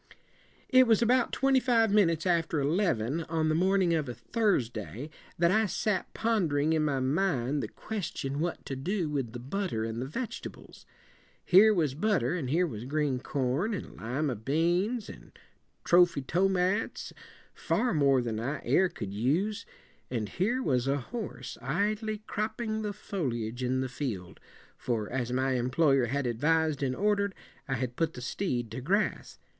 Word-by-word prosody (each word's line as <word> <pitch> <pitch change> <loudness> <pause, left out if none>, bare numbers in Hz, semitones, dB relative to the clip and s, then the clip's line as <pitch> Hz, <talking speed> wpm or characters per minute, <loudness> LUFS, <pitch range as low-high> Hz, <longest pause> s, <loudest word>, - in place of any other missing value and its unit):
"'It 255 -1 +6
was 225 0 +4
about 245 +1 +3
twenty 270 -1 +3
five 230 -4 +3
minutes 170 -6 +3
after 165 -3 +1
eleven, 150 - +1
on 160 -1 0
the - - +2
morning 185 +1 +3
of 155 -5 0
a 120 - -5
Thursday, 120 - -1 0.3
that 170 +1 +3
I 220 +3 +3
sat 205 +1 -1
pondering 160 -10 +1
in 155 -1 +2
my 140 -3 0
mind 140 -1 0
the - - -3
ques 215 -6 -5
ti - - -5
on 140 +2 -3
what 170 +2 -3
to 135 - -4
do 170 +4 -2
with 135 -6 -2
the 120 - -6
butter 140 - -2
and 115 +1 -3
the 130 - -3
veg 235 - -4
et - - -14
ables. - - -16 0.6
Here 200 +4 +7
was 160 -9 +1
butter, 165 - +1
and 155 -8 -3
here 170 +6 +2
was 115 -7 -6
green 145 -2 0
corn 140 - -1
and - - -7
lima 125 +6 -2
beans 175 - 0
and - - -13 0.5
trophy 175 -5 +4
tomats, 190 +6 0 0.4
far 245 - 0
more 140 -4 +3
than 110 -2 -3
I 135 +6 -2
ere 185 0 +3
could 100 - -6
use. 160 - 0 0.4
And 110 -5 -2
here 240 +8 0
was 130 - +1
a 140 +1 +2
horse, 215 - -6
idly 210 +7 -1
cropping 220 +1 -2
the 210 -1 -2
fol 195 -8 -3
i - - -2
age 115 +2 -5
in 130 +1 0
the 130 - -1
field, 120 -9 -5 0.4
for 110 -4 -3
as 125 -1 -2
my 130 +1 +1
employer 130 +2 +2
had 140 +3 -1
advis 155 +7 +2
ed 145 - -7
and 130 -2 0
order 205 0 +2
ed, 200 - -12 0.3
I 135 - 0
had 125 0 -3
put 165 -1 0
the 125 - -8
steed 125 - -2
to 130 - -5
grass. 200 +10 -1
155 Hz, 180 wpm, -29 LUFS, 130-200 Hz, 0.6 s, Here